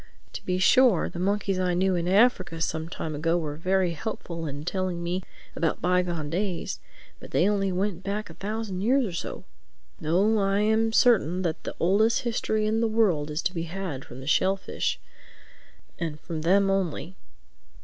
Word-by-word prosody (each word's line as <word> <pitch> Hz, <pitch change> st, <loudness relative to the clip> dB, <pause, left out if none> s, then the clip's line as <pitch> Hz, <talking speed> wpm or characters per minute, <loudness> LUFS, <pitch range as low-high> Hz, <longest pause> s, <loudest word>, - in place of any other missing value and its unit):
"To -, -, -7 dB
be 180 Hz, 0 st, -1 dB
sure, 235 Hz, 0 st, +4 dB
the 170 Hz, -, -7 dB
monkeys 200 Hz, 0 st, 0 dB
I 180 Hz, -1 st, +1 dB
knew 185 Hz, +1 st, +2 dB
in 170 Hz, 0 st, -1 dB
Africa 190 Hz, -4 st, +3 dB
some 160 Hz, 0 st, -2 dB
time 160 Hz, -2 st, -4 dB
ago 165 Hz, +3 st, +1 dB
were 150 Hz, -3 st, -3 dB
very 185 Hz, +2 st, +1 dB
helpful 165 Hz, -1 st, -5 dB
in 145 Hz, +1 st, -6 dB
telling 185 Hz, -2 st, -2 dB
me 175 Hz, +2 st, -1 dB, 0.3 s
about 165 Hz, -2 st, 0 dB
bygone 175 Hz, -4 st, 0 dB
days; 180 Hz, -1 st, -2 dB, 0.4 s
but -, -, -11 dB
they 180 Hz, -, +3 dB
only 195 Hz, -2 st, +1 dB
went 185 Hz, -1 st, -1 dB
back 200 Hz, +2 st, -3 dB
a -, -, -11 dB
thousand 210 Hz, -2 st, -4 dB
years 255 Hz, +5 st, +3 dB
or 200 Hz, -, -4 dB
so. 170 Hz, -, -5 dB, 0.6 s
No, 195 Hz, +8 st, +2 dB
I 195 Hz, +1 st, +2 dB
am 220 Hz, +1 st, +2 dB
certain 190 Hz, -, +3 dB
that 165 Hz, -3 st, -3 dB
the -, -, -4 dB
oldest 210 Hz, +6 st, +3 dB
history 220 Hz, -2 st, 0 dB
in 220 Hz, +1 st, +1 dB
the 230 Hz, -, +3 dB
world 195 Hz, -10 st, +2 dB
is 150 Hz, +2 st, -3 dB
to 185 Hz, -, 0 dB
be 165 Hz, -2 st, -3 dB
had 175 Hz, -7 st, -4 dB
from 125 Hz, +2 st, -10 dB
the -, -, -9 dB
shellfish—and 170 Hz, -2 st, -3 dB
from 160 Hz, -2 st, -5 dB
them 195 Hz, +4 st, +3 dB
only. 180 Hz, -2 st, -2 dB
185 Hz, 175 wpm, -26 LUFS, 165-205 Hz, 0.6 s, sure